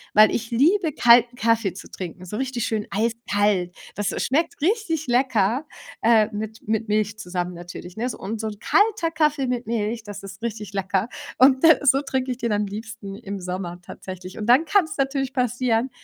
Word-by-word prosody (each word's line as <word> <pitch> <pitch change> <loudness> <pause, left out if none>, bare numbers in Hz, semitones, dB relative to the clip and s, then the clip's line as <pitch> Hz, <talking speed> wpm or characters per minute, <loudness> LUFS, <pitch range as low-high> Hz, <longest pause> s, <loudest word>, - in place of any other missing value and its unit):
weil 215 +1 +7
ich 230 0 -2
liebe 320 - +3
kalten 240 -1 +5
Kaffee 230 -4 +1
zu 190 - -11
trinken, 185 0 -7
so 210 +4 -5
richtig 255 -3 -2
schön 215 -2 -2
eiskalt. 205 -4 0 0.2
Das, 205 -1 -1
äh, - - -4
schmeckt 320 +6 0
richtig 340 -4 0
lecker, 245 0 +2 0.4
äh, 225 -2 +5
mit 220 +1 -6
mit 220 0 0
Milch 210 0 0
zusammen 180 -2 -3
natürlich, 175 +1 -9
ne? 235 +3 -2
Und 215 +3 -5
so 220 - -2
'n 210 -1 -6
kalter 410 -6 +2
Kaffee 300 -3 +1
mit 250 -1 -2
Milch, 225 0 -1
das 205 -2 -8
ist 195 +1 -10
richtig 215 -3 -5
lecker. 195 +3 -1 0.3
Und, 260 +1 +5
äh, 320 -1 +7
so 270 0 +5
trinke 265 -2 -2
ich 245 - -3
den 235 -2 -1
am 210 0 +1
liebsten 210 -1 -7
im 200 -2 -6
Sommer 180 -1 -5
tatsächlich. 185 0 -9
Und 215 - -4
dann 260 +7 +5
kann's 330 -3 +1
natürlich 270 -1 -1
passieren, 250 -1 +1
225 Hz, 185 wpm, -23 LUFS, 205-260 Hz, 0.4 s, weil